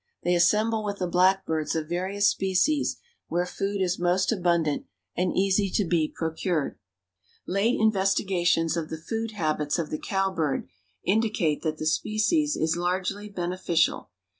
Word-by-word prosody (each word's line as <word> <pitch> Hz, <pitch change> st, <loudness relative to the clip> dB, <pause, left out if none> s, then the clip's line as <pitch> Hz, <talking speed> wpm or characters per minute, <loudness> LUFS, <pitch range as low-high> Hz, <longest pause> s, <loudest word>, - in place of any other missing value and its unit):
They 175 Hz, -, +2 dB
assemble 215 Hz, +6 st, +3 dB
with 200 Hz, -1 st, -3 dB
the 185 Hz, -, -1 dB
blackbirds 180 Hz, -3 st, +1 dB
of 160 Hz, -1 st, -2 dB
various 190 Hz, +4 st, 0 dB
species 195 Hz, +11 st, +1 dB, 0.3 s
where 175 Hz, +1 st, 0 dB
food 195 Hz, +2 st, -2 dB
is 180 Hz, 0 st, -1 dB
most 180 Hz, +3 st, +2 dB
abundant 170 Hz, -7 st, 0 dB, 0.3 s
and 180 Hz, +1 st, +1 dB
easy 195 Hz, +1 st, +2 dB
to 205 Hz, -, +2 dB
be 165 Hz, -2 st, +1 dB
procured. 160 Hz, -1 st, -2 dB, 0.7 s
Late 200 Hz, +6 st, +1 dB
investigations 190 Hz, -5 st, +2 dB
of 165 Hz, -2 st, -3 dB
the 160 Hz, -, -4 dB
food 225 Hz, +7 st, -4 dB
habits 155 Hz, -5 st, -1 dB
of 165 Hz, -3 st, -3 dB
the 155 Hz, -, -2 dB
cowbird 190 Hz, -, -1 dB, 0.4 s
indicate 200 Hz, -7 st, +1 dB
that 155 Hz, -2 st, -2 dB
the 155 Hz, -, -4 dB
species 220 Hz, -, +1 dB
is 160 Hz, +1 st, +1 dB
largely 185 Hz, +4 st, -2 dB
beneficial. 175 Hz, -3 st, 0 dB
185 Hz, 140 wpm, -26 LUFS, 165-200 Hz, 0.7 s, assemble